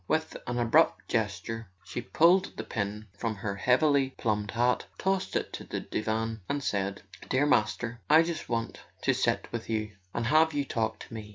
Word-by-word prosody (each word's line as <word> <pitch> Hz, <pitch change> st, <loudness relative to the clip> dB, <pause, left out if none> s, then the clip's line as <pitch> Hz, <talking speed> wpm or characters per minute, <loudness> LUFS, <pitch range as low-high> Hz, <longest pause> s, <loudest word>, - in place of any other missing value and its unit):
With 160 Hz, 0 st, 0 dB
an 120 Hz, 0 st, -1 dB
abrupt 120 Hz, -1 st, +3 dB
gesture 115 Hz, -2 st, -2 dB
she 120 Hz, -, -5 dB
pulled 175 Hz, +9 st, +3 dB
the -, -, -3 dB
pin 105 Hz, -1 st, -3 dB
from 115 Hz, -2 st, -2 dB
her 100 Hz, 0 st, -4 dB
heavily 135 Hz, +4 st, +3 dB
plumed 105 Hz, -2 st, 0 dB
hat, 120 Hz, +2 st, +1 dB
tossed 190 Hz, 0 st, 0 dB
it -, -, -1 dB
on -, -, -11 dB
the -, -, -2 dB
divan, 110 Hz, +1 st, -2 dB
and 140 Hz, 0 st, -1 dB
said: 100 Hz, -2 st, -1 dB, 0.3 s
"Dear 135 Hz, +3 st, +3 dB
Master, 115 Hz, -2 st, +1 dB
I 155 Hz, +2 st, +8 dB
just 170 Hz, -1 st, -4 dB
want 115 Hz, -1 st, -2 dB, 0.2 s
to -, -, +3 dB
sit -, -, 0 dB
with 115 Hz, -1 st, -5 dB
you 110 Hz, -1 st, -1 dB, 0.2 s
and 115 Hz, -, -2 dB
have 155 Hz, +4 st, +4 dB
you 145 Hz, -1 st, +1 dB
talk 110 Hz, -3 st, -1 dB
to -, -, -10 dB
me." 110 Hz, -2 st, -7 dB
115 Hz, 185 wpm, -29 LUFS, 110-145 Hz, 0.3 s, I